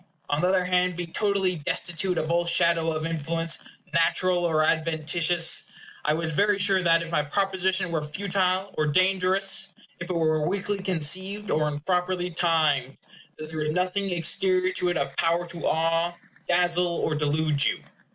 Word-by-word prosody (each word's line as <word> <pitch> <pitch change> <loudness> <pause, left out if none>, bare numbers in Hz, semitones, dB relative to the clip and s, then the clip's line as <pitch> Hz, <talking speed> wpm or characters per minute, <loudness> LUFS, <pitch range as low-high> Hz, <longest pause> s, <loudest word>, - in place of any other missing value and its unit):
On 145 +1 +1
the 180 - +2
other 185 -1 +2
hand, 180 0 +1
being 170 -1 -6
totally 195 -4 0
destitute 175 +4 -1
of 155 - -1
all 170 0 +1
shadow 170 -1 +2
of 155 0 -3
influence, 165 +1 -2 0.3
natural 175 +2 +2
or 160 -2 +2
adventitious, 165 +1 +1 0.4
I 150 - +1
was 160 -1 -1
very 205 +4 +2
sure 190 -1 +2
that, 165 -1 +3
if 165 - -8
my 160 - +2
proposition 190 +2 0
were 160 -2 -1
futile 185 +4 -1
or 155 - +2
dangerous 185 +3 +1 0.3
if 170 +1 -7
it - - -1
were 155 -2 +1
weakly 200 +1 -2
conceived, 190 +4 0
or 155 0 +1
improperly 180 +4 -1
timed 155 -6 +1 0.4
there 155 0 -7
was 150 0 -1
nothing 185 +4 -1
exterior 185 +2 +2
to 180 - -1
it 175 - 0
of 140 0 -3
power 170 +1 +1
to 170 -2 -4
awe, 165 +2 +1 0.4
dazzle, 175 0 +2
or 160 - -1
delude 150 0 0
you. - - 0
170 Hz, 160 wpm, -25 LUFS, 160-185 Hz, 0.4 s, that